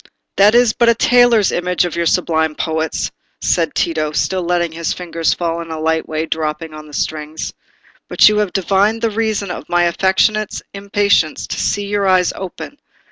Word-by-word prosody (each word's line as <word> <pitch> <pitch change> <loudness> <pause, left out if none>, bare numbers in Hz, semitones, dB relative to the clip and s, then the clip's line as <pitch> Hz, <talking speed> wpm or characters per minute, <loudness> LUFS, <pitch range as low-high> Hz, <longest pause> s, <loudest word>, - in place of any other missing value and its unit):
"That 205 +3 +5
is 240 -2 +4
but 235 -2 +3
a 235 - +4
tailor's 245 -3 +4
image 180 0 0
of 175 - -4
your 170 0 0
sublime 160 -3 +1
poet's," 160 0 -2 0.3
said - - 0
Tito, 155 -2 0
still 185 +4 0
letting 175 -1 0
his 165 0 -3
fingers 170 -2 -1
fall 170 -1 -2
in 165 - -9
a 160 -1 -5
light 160 0 0 0.2
dropping 160 0 -3
way 155 - -10
on 155 0 -11
the - - -14
strings. 155 +1 -4 0.5
"But - - +5
you 210 0 +3
have 205 -3 0
divined 200 +4 +1
the 225 - +1
reason 210 -3 -1
of - - -8
my 175 0 +2
affectionate 190 +4 +1
impatience 200 -4 +1
to - - -5
see 205 0 -1
your 200 -1 -1
eyes 185 -1 +3
open. 190 +9 -8
180 Hz, 185 wpm, -17 LUFS, 160-205 Hz, 0.5 s, That